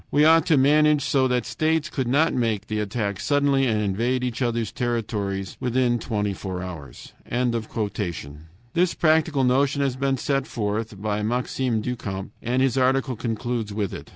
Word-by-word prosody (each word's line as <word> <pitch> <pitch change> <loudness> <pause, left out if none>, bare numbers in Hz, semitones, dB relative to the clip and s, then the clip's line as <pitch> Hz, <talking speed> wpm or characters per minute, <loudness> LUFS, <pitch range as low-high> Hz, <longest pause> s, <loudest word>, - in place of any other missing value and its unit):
"We 150 +1 +4
ought 165 +1 +5
to 155 - +4
manage 150 +1 +4
so 135 -2 +2
that 125 -2 0
states 160 0 0
could 135 -7 -3
not 145 +6 +3
make 110 -4 0
the 110 0 -3
attack 105 -1 -2
suddenly 140 -2 +2
and 110 -2 +1
invade 115 +5 0
each 125 0 -3
other's 115 -3 0
territories 105 -6 -2
within 125 -1 +1
twenty 105 -3 -2
four 95 -1 -5
hours." 85 -7 -9 1.6
This 175 0 +2
practical 155 -3 +2
notion 140 +3 +2
has 135 -2 0
been 135 0 0
put 135 0 -1
forth 105 -2 -3
by 105 0 -1
Maxime 120 +1 -1
du 125 +3 -2
Camp, 95 -4 -6
and 125 +2 +1
his 135 -1 +2
article 130 0 +2
concludes 115 -1 -3
with 105 -3 -2
it. - - -8
125 Hz, 165 wpm, -24 LUFS, 105-135 Hz, 1.6 s, ought